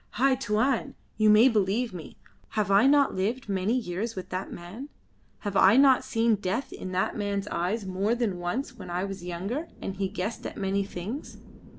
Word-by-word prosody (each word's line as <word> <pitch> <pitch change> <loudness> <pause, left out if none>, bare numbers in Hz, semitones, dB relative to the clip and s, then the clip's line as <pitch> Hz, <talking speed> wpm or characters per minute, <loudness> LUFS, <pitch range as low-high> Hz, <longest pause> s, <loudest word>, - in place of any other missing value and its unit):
"Hai 265 +4 +3
Tuan, 250 0 0 0.2
you 215 0 +4
may 215 +4 +7
believe 220 0 +1
me. 170 -4 -9 0.4
Have 205 -2 +1
I 200 +6 +6
not 280 0 +4
lived 215 +7 -2
many 200 +4 0
years 220 +1 -3
with 185 - -6
that 185 +1 -4
man? 205 +12 -8 0.5
Have 205 -2 -4
I 195 +4 +6
not 270 -2 +6
seen 225 -1 +2
death 205 +7 -3
in 185 - -6
that 185 +1 0
man's 200 -1 -2
eyes 195 +5 -1
more 195 +4 0
than 220 -7 -1
once 240 +9 -3
when 185 -2 -8
I 175 +1 -1
was 195 -2 -5
younger 195 - -4
and 195 - -5
he 195 0 0
guessed 200 +6 -4
at - - -9
many 195 0 0
things. 200 - -6
205 Hz, 190 wpm, -27 LUFS, 185-235 Hz, 0.5 s, may